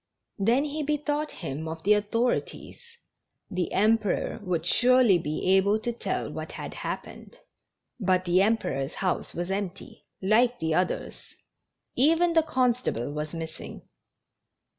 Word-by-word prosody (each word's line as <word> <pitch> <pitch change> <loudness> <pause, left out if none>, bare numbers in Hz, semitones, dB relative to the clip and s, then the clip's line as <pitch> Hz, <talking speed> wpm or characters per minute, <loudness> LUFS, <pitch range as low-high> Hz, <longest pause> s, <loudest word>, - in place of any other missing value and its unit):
Then 235 +8 +3
he 300 +1 -3
be 300 +1 0
thought 295 +1 -2
him 160 -2 -6
of 160 0 -6
the 210 - +5
authorities; 230 - -1 0.7
the 180 -3 -2
Emperor 215 0 +1
would 175 -4 -2
surely 245 -2 +5
be 155 -1 -3
able 200 +2 +3
to 235 +2 -3
tell 230 - -3
what - - -6
had - - -6
happened. - - -7 0.6
But 185 -3 +1
the 175 +1 +3
Emper 215 -8 +1
or's 135 - -7
house 185 -3 -2
was 175 +2 -3
empty, 195 -2 -5
like 235 +5 +3
the 160 0 -1
others! 180 +3 -2 0.6
Even 330 +6 +4
the 325 - +5
con 255 -6 +2
stable 145 - -3
was 150 +2 -5
missing! 160 -1 -7
205 Hz, 140 wpm, -27 LUFS, 175-250 Hz, 0.7 s, the